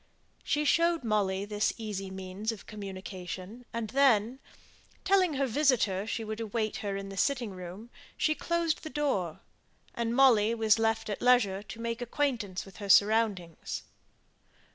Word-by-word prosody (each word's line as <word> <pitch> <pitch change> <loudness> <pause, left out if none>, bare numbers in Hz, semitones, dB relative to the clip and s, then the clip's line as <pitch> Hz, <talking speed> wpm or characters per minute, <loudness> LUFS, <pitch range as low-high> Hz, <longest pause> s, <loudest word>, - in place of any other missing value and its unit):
She 300 +1 0
showed 335 0 +3
Molly 200 -3 0
this 210 0 0
easy 205 -3 -5
means 190 +3 -4
of 225 - -10
communication, 195 +2 -7
and 230 -2 -3
then, 255 -2 +3 0.6
telling 370 -5 +3
her 275 0 +1
visitor 225 -7 +2
she 225 0 -2
would 220 0 -5
await 220 -1 -2
her 200 -1 -3
in 195 0 -6
the 195 - -8
sitting 245 -1 0
room, 185 +5 -9 0.3
she 310 - +2
closed 335 0 -1
the 315 - -6
door, 235 - -1 0.5
and 235 0 -1
Molly 235 -4 +5
was 220 -1 +3
left 225 0 +1
at 205 - -4
leisure 235 -6 +4
to 215 +2 -10
make 230 +1 -3
acquaintance 235 -7 -2
with 195 - -14
her 200 -2 -7
surroundings. 200 -5 +2
220 Hz, 150 wpm, -30 LUFS, 195-250 Hz, 0.6 s, Molly